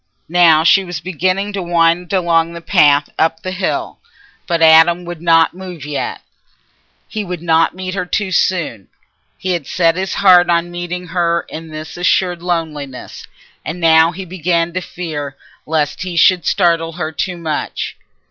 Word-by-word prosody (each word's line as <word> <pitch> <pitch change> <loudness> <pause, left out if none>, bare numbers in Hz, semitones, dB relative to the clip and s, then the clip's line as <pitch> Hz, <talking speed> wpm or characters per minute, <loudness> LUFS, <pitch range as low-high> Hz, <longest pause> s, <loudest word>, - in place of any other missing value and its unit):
Now 165 -2 +5
she 195 +4 +5
was 175 -4 -6
beginning 185 +4 -2
to 195 - -3
wind 170 0 +1
along 170 -3 +1
the 170 - -8
path 145 -3 +3
up 160 0 0
the 185 - -4
hill, 185 0 -3 0.5
but 170 -2 0
Adam 165 +2 +5
would 175 -2 -7
not 165 -1 +3
move 180 -5 -9
yet; 145 -1 -4 0.9
he 215 -2 -4
would 180 -3 -6
not 165 0 +2
meet 185 0 -5
her 180 -2 -3
too 195 0 -2
soon; 160 - -1 0.5
he 185 - -3
had 170 -6 -3
set 165 -2 +2
his 190 0 -3
heart 180 -2 +5
on 170 0 +1
meeting 175 0 -6
her 170 -1 0
in 165 +1 -8
this 155 +1 -8
assured 180 0 +1
loneliness. 155 -7 -5 0.4
And 165 +3 -5
now 165 0 +5
he 185 +2 -8
began 170 -1 -1
to 185 - -2
fear 150 -6 -6 0.3
lest 150 -2 -1
he 180 -2 -4
should 180 -3 +4
startle 165 -3 +1
her 160 -2 -4
too 175 +4 -3
much. 160 -3 -4
170 Hz, 165 wpm, -16 LUFS, 160-180 Hz, 0.9 s, Now